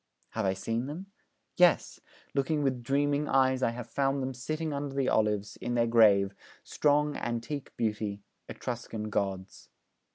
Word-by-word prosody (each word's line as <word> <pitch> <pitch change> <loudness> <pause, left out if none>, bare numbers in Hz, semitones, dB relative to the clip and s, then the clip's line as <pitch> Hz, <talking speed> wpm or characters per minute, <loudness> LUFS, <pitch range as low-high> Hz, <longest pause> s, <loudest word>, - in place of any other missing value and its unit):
Have 110 -2 -2
I 95 - +2
seen 115 +6 -2
them? 180 +7 -7 0.5
Yes, 180 -2 +4 0.3
looking 145 +2 +1
with 130 -3 0
dreaming 145 +3 +1
eyes, 130 -1 +3
I 125 - +3
have 120 0 -6
found 135 +2 0
them 130 0 -3
sitting 155 +5 -3
under 140 -1 -4
the 135 -2 +1
olives, 105 -2 +1
in 120 0 -3
their 120 -1 +3
grave, 105 -4 +5 0.3
strong, 150 0 +2
antique 120 +4 -4
beauty 105 -2 -2 0.3
Etruscan 110 -3 -5
gods!' 95 -2 -3
125 Hz, 150 wpm, -30 LUFS, 110-140 Hz, 0.5 s, grave